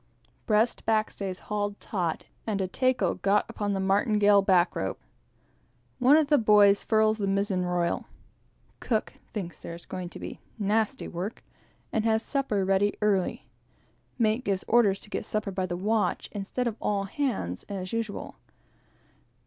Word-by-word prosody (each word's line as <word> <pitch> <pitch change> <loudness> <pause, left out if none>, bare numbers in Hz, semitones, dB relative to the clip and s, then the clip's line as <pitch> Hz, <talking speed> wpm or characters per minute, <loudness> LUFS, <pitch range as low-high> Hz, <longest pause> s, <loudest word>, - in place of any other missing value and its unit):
Breast 220 +2 +2
backstays 210 -4 -1
hauled 205 -1 -3
taut, 180 -7 -2 0.2
and 210 -2 0
tackle 255 -1 +2
got 200 +1 +2
upon 205 -1 -2
the 195 - -1
martingale 205 +1 +4
back 180 -3 +3
rope. 95 - -3 1.0
One 265 +4 +6
of 315 - +4
the 290 0 +4
boys 205 -2 +5
furls 220 0 +2
the 200 - 0
mizen 195 -1 0
royal. 175 -1 -1 0.7
Cook 220 -3 -1 0.2
thinks 180 -6 -5
there 170 - -7
is 170 - -12
going 180 -1 -5
to - - -10
be - - -7 0.2
"nasty 220 +4 0
work," 185 +6 -5 0.5
and 220 - +1
has 220 0 +2
supper 240 -9 0
ready 195 +2 +2
early. 200 -3 0 0.7
Mate 225 +1 +2
gives 195 -2 -1
orders 210 -4 +4
to - - -9
get - - -2
supper 215 -2 -2
by 185 -1 -2
the 175 - -3
watch, 215 +3 0
instead 205 +5 -3
of 230 -2 -2
all 200 -1 0
hands, 200 - -2
as 190 -1 -5
usual. 225 -3 -4
205 Hz, 150 wpm, -27 LUFS, 190-220 Hz, 1.0 s, One